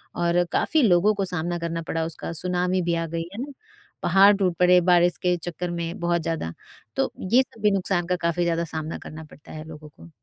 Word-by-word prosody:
और 175 0 +2
काफ़ी 315 -2 +2
लोगों 200 -1 +4
को 200 -1 -1
सामना 175 -1 -1
करना 165 0 -3
पड़ा 160 0 -1
उसका, 165 +1 -6
सुनामी 180 +2 0
भी 170 0 0
आ 165 0 -1
गई, 165 +1 -3
है 225 - -5
ना? 285 - -6 0.5
पहाड़ 195 +3 +6
टूट 185 -4 0
पड़े 180 0 +6
बारिश 175 0 +4
के 180 -1 +2
चक्कर 175 +1 -5
में 170 0 -4
बहुत 170 0 0
ज़्यादा, 160 - -3 0.4
तो - - 0 0.2
ये 255 - +7
सब 225 -4 -10
भी 210 - +4
नुकसान 190 -2 0
का 180 - +1
काफ़ी 170 +1 0
ज़्यादा 170 0 0
सामना 155 0 -4
करना 160 +1 -10
पड़ता 150 -1 -16
है 155 0 -7
लोगों 150 -1 -11
को। 165 +3 -16
175 Hz, 215 wpm, -24 LUFS, 165-180 Hz, 0.5 s, ये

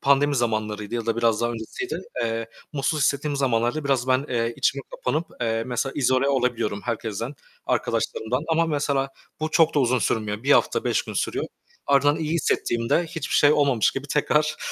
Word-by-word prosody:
pandemi 140 +1 +3
zamanlarıydı 110 -2 -2
ya 115 -1 -3
da 115 -1 0
biraz 115 -2 +2
daha 120 0 +1
öncesiydi, 120 - -5 0.2
eee, 115 0 -2 0.3
mutsuz 150 +2 0
hissettiğim 145 +1 +1
zamanlarda 125 +2 0
biraz 135 -2 +1
ben, 130 +2 +3
eee, 115 -1 0
içime - - +1
kapanıp, - - -2
eee, 115 -1 0
mesela 125 +2 -2
izole 130 0 +2
olabiliyorum 120 -6 0
herkesten, 115 +2 -3 0.3
arkadaşlarımdan 125 +6 -1
ama 165 +1 +2
mesela 140 -3 0 0.3
bu 155 0 -1
çok 160 0 +4
da - - +3
uzun 130 -1 +2
sürmüyor, 105 -2 -1
1 140 +2 +4
hafta - - +3
5 - - +1
gün - - -8
sürüyor. - - -1 0.4
Ardından 145 +1 +4
iyi 160 -1 -2
hissettiğimde 120 -3 +1
hiçbir 160 -2 -4
şey 145 0 +6
olmamış 140 -7 +3
gibi 135 +1 -5
tekrar, 150 +1 +1
130 Hz, 170 wpm, -24 LUFS, 115-145 Hz, 0.4 s, şey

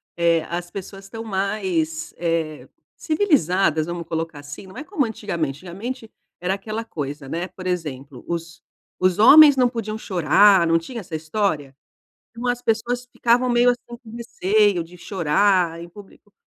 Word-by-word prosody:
eh, 170 -1 +2
as 175 0 -4
pessoas 195 +1 -8
estão 225 +3 -8
mais, 190 -6 -2
eh, 165 -3 -2 0.3
civilizadas, 195 - +1
vamos 170 -1 -5
colocar 165 -2 -4
assim, 145 +6 -10
não 190 - -13
é - - -5
como 310 -5 -1
antigamente. 170 -10 -3
Antigamente 225 +6 -6 0.3
era 180 +2 -1
aquela 215 +3 -5
coisa, 145 -6 -6
né, 170 +6 -3
por 185 -1 -9
exemplo, 140 -7 -4
os 170 0 -5 0.4
os 185 0 +3
homens 290 +6 +9
não 250 -1 +5
podiam 225 -3 -4
chorar, 185 0 +4
não 165 - +4
tinha 200 +9 -6
essa 180 -6 -7
história? 155 -4 -2 0.6
Umas 245 +1 -1
pessoas 240 +2 -1
ficavam 245 +1 +2
meio 240 0 +4
assim, 240 -1 -5
com 225 - -13
receio 210 -4 +1
de 175 +2 -14
chorar 180 -1 +1
em 170 - -9
público. 205 +2 -16
185 Hz, 155 wpm, -22 LUFS, 165-225 Hz, 0.6 s, homens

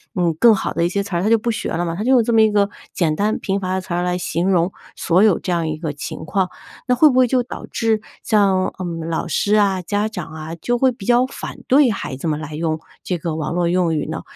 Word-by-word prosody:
嗯， 175 -2 +1
更 235 -2 +7
好 - - -3
的 170 - +1
一 - - +1
些 200 +2 -1
词 200 -2 -5
儿， 170 - 0
他 210 - +2
就 230 - +5
不 235 +2 -1
学 225 - -3
了 170 +1 -1
嘛， 165 -1 -3
他 200 - -3
就 255 - +2
用 250 -3 +5
这 235 - -1
么 225 - +6
一 220 -1 +4
个 205 -1 +2 0.2
简 165 -4 +1
单 210 +5 0
贫 195 0 -1
乏 185 -1 -2
的 190 - -1
词 180 - -6
儿 175 +1 0
来 180 0 0
形 175 +1 -1
容 180 -1 +2 0.2
所 180 +3 +2
有 210 -5 +4
这 185 - -4
样 170 -2 0
一 155 - -2
个 155 -1 -3
情 145 +2 -7
况。 185 +3 0 0.4
那 250 - +3
会 305 +5 +6
不 255 - 0
会 255 -1 +5
就 250 0 +1
导 245 - -8
致 225 -2 0 0.2
像， 195 -3 +2
嗯， 165 -3 -4
老 165 - -2
师 205 +5 +1
啊， 200 -3 +2
家 205 +4 -1
长 180 -7 -7
啊， 155 +1 -7
就 245 +8 -1
会 260 +2 +4
比 220 -4 -11
较 245 +2 +4
反 260 - -7
对 270 0 +5
孩 165 -9 -4
子 135 +6 -5
们 150 -1 -1
来 155 -1 -7
用 160 0 -1 0.2
这 180 - -2
个 165 -1 -3
网 160 +1 -3
络 175 0 +1
用 175 -1 +1
语 150 - -1
呢？ 160 - -4
185 Hz, 300 characters per minute, -20 LUFS, 165-220 Hz, 0.4 s, 更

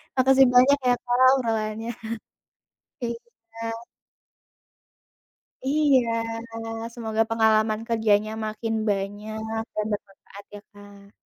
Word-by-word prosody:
Makasih 265 0 +5
banyak 255 +3 +5
ya 245 - +4
Kak, 245 - -7 0.2
obrolannya. 225 -2 -2 1.1
Iya. 230 -1 -7 2.0
Iya. 285 -2 +4 0.9
Semoga 225 -2 0
pengalaman 220 -1 +2
kerjanya 215 -2 +2
makin 225 +1 -3 0.2
banyak 215 +3 -3
dan 215 - -1
bermanfaat 200 0 -8
ya 205 - -8
Kak. 205 0 -16
225 Hz, 85 wpm, -25 LUFS, 215-240 Hz, 2.0 s, Makasih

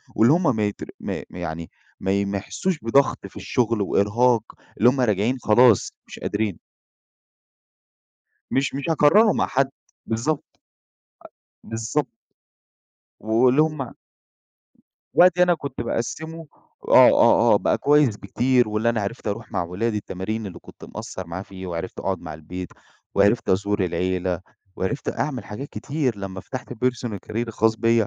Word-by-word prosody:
واللي 115 +6 +5
هم 165 -7 +2
ما 105 - +1
يت 100 - -6 0.2
ما - - -4
يعني 85 -2 -6 0.3
ما 100 +1 0
ما 100 0 -2
يحسوش 165 - -3
بضغط 135 +5 +2
في - - -20
الشغل 115 -3 0
وإرهاق، 110 +5 +2 0.3
اللي 120 - +6
هم 130 0 0
راجعين 110 +3 +1
خلاص، 120 -1 +4
مش - - -10
قادرين. 105 -4 -2 1.9
مش 135 +1 0
مش 140 +4 -3
هاكرره 200 +8 +5
مع - - +1
حد، 135 +1 +1 0.4
بالضبط. 130 +7 -1 1.2
أ - - -15
بالضبط، 115 +6 -1 1.1
واللي 125 +6 +3
هم 150 -5 -1 1.2
وقتي 180 0 +6
أنا 175 -1 +5
كنت 140 -5 -7
باقسمه 160 +8 -4 0.4
آه، - - +8
آه، - - +5
آه، - - +6
بقى - - +1
كويس 145 -6 +3
بكتير 120 +4 +1
واللي 105 +2 0
أنا 115 -2 +1
عرِفت 105 +2 -4
أروح 105 +2 -5
مع - - 0
ولادي 105 +6 -2
التمارين 105 +3 -4
اللي 85 -3 -8
كنت - - -14
مقصر 95 -2 -7
معاه 85 +3 -5
فيه 95 -1 -9
وعرِفت 85 +1 -5
أقعد 95 -2 -2
مع 80 - -7
البيت، 90 +3 -7 0.5
وعرِفت 100 +4 +3
أزور 100 +1 +1
العيلة 90 +1 -1 0.4
وعرفت 95 +9 -3
أعمل 140 -5 -2
حاجات 120 +8 -7
كتير، 140 -5 -2
لما 95 -1 -6
فتحت 130 +6 -7
الpersonal 120 -3 -2
career 110 - -7
الخاص 115 0 +1
بيَّ. 115 -1 +2
115 Hz, 145 wpm, -23 LUFS, 100-130 Hz, 1.9 s, آه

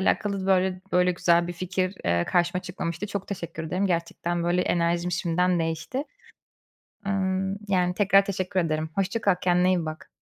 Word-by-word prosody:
alakalı 195 0 0
böyle 185 -1 +2
böyle 180 0 +4
güzel 175 -1 +3
bir - - -3
fikir, 185 +2 -2
eee, 85 0 +2
karşıma 175 0 +1
çıkmamıştı. 180 0 -4
Çok 200 -1 -5
teşekkür 170 -4 -5
ederim. 180 +5 0
Gerçekten, 170 -1 -1
böyle, 175 +1 +2
enerjim 170 +1 +1
şimdiden 175 +1 +1
değişti. 165 - -2 1.0
Imm, 190 0 0
yani, 180 -2 +2
tekrar 195 0 +4
teşekkür 185 -1 -1
ederim. 155 -2 -1
Hoşça 195 +4 0
kal, 200 -4 +3
kendine 180 0 +3
iyi 180 -3 +2
bak. 155 0 -7
180 Hz, 160 wpm, -26 LUFS, 170-190 Hz, 1.0 s, böyle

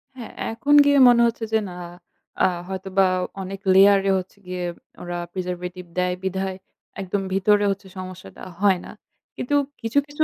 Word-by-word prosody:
হ্যাঁ 245 -3 -9 0.2
এখন 285 +6 0
গিয়ে 285 0 +4
মনে 240 -1 +6
হচ্ছে 230 0 -4
যে, 220 - +4
"না 175 - -9 0.7
আ - - +6 0.2
হয়তোবা 190 0 0 0.3
অনেক 190 +1 -6
লেয়ারে 195 0 +6
হচ্ছে 190 +2 -7
গিয়ে 180 0 -4 0.4
ওরা 175 0 -4 0.2
preservative 180 -1 -5
দেয় 180 0 +1
বিধায় 190 0 -2 0.4
একদম 195 +1 -2
ভিতরে 205 +2 +3
হচ্ছে 195 0 -6
সমস্যাটা 185 - -9 0.2
হয় 195 -3 +4
না।" - - -9 0.4
কিন্তু 290 +4 -1 0.3
কিছু, 230 +5 +1
কিছু 295 +2 0
190 Hz, 150 wpm, -23 LUFS, 185-210 Hz, 0.7 s, মনে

